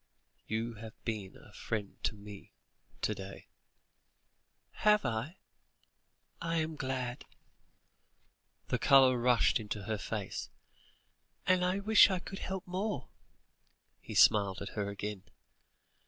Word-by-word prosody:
You 115 Hz, +2 st, -2 dB
have 110 Hz, -1 st, -10 dB
been 105 Hz, -5 st, -4 dB
a -, -, -17 dB
friend 105 Hz, -3 st, -5 dB
to -, -, -1 dB
me 100 Hz, -1 st, -12 dB, 0.5 s
to -, -, +2 dB
day." 95 Hz, 0 st, -9 dB, 1.3 s
"Have 210 Hz, -5 st, +4 dB
I? 120 Hz, +9 st, -2 dB, 1.0 s
I 165 Hz, 0 st, -1 dB
am 160 Hz, 0 st, -1 dB
glad," 130 Hz, -3 st, -3 dB, 1.5 s
the -, -, 0 dB
colour 130 Hz, -2 st, +6 dB
rushed 120 Hz, -1 st, +3 dB
into 105 Hz, -1 st, -5 dB
her 110 Hz, +1 st, -2 dB
face, 105 Hz, -2 st, -4 dB, 1.0 s
"and 185 Hz, -1 st, +3 dB
I 185 Hz, +2 st, +1 dB
wish 215 Hz, +1 st, +7 dB
I 190 Hz, -, 0 dB
could 195 Hz, +2 st, -7 dB
help 190 Hz, -1 st, -4 dB
more." 185 Hz, -, -3 dB, 0.9 s
He -, -, -9 dB
smiled 100 Hz, -3 st, +5 dB
at 100 Hz, -, -5 dB
her 100 Hz, -2 st, -3 dB
again. 100 Hz, 0 st, -5 dB
120 Hz, 120 wpm, -32 LUFS, 105-170 Hz, 1.5 s, wish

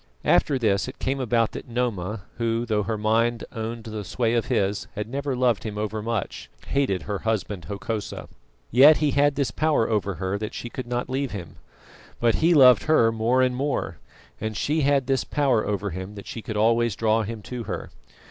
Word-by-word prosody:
After 140 Hz, -3 st, +3 dB
this 105 Hz, -4 st, +1 dB
it 130 Hz, -, -8 dB
came 135 Hz, +1 st, -2 dB
about 120 Hz, -3 st, +1 dB
that -, -, -8 dB
Noma, 110 Hz, -5 st, -2 dB
who, 115 Hz, 0 st, 0 dB
though 110 Hz, -2 st, +1 dB
her 110 Hz, +1 st, -2 dB
mind 115 Hz, +2 st, +1 dB
owned 115 Hz, +1 st, -5 dB
the 110 Hz, -1 st, -6 dB
sway 115 Hz, +4 st, -1 dB
of 115 Hz, -2 st, +1 dB
his, 100 Hz, +1 st, 0 dB
had 105 Hz, +1 st, -3 dB
never 140 Hz, +2 st, -2 dB
loved 125 Hz, -4 st, +1 dB
him 105 Hz, -2 st, -5 dB
over 110 Hz, 0 st, -2 dB
much, 115 Hz, -2 st, -4 dB, 0.2 s
hated 130 Hz, -11 st, 0 dB
her 100 Hz, -2 st, -3 dB
husband 105 Hz, -4 st, -2 dB
Hokosa. 105 Hz, +1 st, -5 dB, 0.4 s
Yet 140 Hz, +6 st, +8 dB
he 150 Hz, -2 st, +1 dB
had 145 Hz, +1 st, +3 dB
this 135 Hz, -5 st, 0 dB
power 155 Hz, -5 st, +1 dB
over 100 Hz, -3 st, -1 dB
her 95 Hz, +2 st, -2 dB
that 110 Hz, 0 st, -5 dB
she 120 Hz, -, -6 dB
could 130 Hz, -2 st, -6 dB
not 120 Hz, 0 st, -2 dB
leave 130 Hz, -1 st, -2 dB
him. 90 Hz, -5 st, -7 dB, 0.6 s
But 115 Hz, -1 st, +3 dB
he 170 Hz, +1 st, +4 dB
loved 130 Hz, -4 st, +7 dB
her 120 Hz, -8 st, +4 dB
more 115 Hz, +3 st, +2 dB
and 125 Hz, -1 st, +1 dB
more, 140 Hz, +1 st, -2 dB, 0.4 s
and 110 Hz, -1 st, -3 dB
she 155 Hz, +2 st, 0 dB
had 140 Hz, -2 st, +2 dB
this 135 Hz, +1 st, +1 dB
power 135 Hz, -7 st, +1 dB
over 100 Hz, -1 st, -2 dB
him 95 Hz, +4 st, -6 dB
that 100 Hz, -, -9 dB
she 115 Hz, -, -6 dB
could 110 Hz, -1 st, -5 dB
always 115 Hz, 0 st, +2 dB
draw 110 Hz, 0 st, +2 dB
him 110 Hz, 0 st, -5 dB
to 120 Hz, 0 st, -6 dB
her. -, -, -5 dB
115 Hz, 200 wpm, -24 LUFS, 105-130 Hz, 0.6 s, Yet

